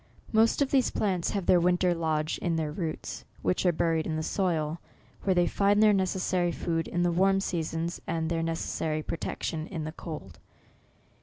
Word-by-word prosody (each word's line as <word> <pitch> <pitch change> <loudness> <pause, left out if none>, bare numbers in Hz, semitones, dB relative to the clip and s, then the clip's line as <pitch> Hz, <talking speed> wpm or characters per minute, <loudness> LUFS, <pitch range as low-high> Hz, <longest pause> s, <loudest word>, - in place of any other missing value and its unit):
Most 225 +5 +4
of 275 - -4
these 265 -2 +3
plants 185 -5 0
have 200 -3 -2
their 180 - +5
winter 180 +1 +3
lodge 155 -2 -1
in 170 -2 0
their 155 -2 -1
roots, 160 -1 -4 0.2
which 180 0 +1
are - - +6
buried 165 -1 0
in 160 - -1
the 155 - -2
soil, 165 -4 0 0.4
where 190 -2 +1
they 175 0 +4
find 200 +2 +2
their 215 0 +6
*92 - - +3
NOVEMBER. - - +3
necessary 185 -1 0
food 165 -1 -2
in 175 - 0
the 175 - +2
warm 195 +3 +3
seasons, 170 -2 -2
and 165 -1 -1
their 165 0 0
necessary 160 -1 -2
protection 160 0 -3
in 165 -5 -4
the 155 - -4
cold. 155 - -8
170 Hz, 190 wpm, -28 LUFS, 160-185 Hz, 0.4 s, are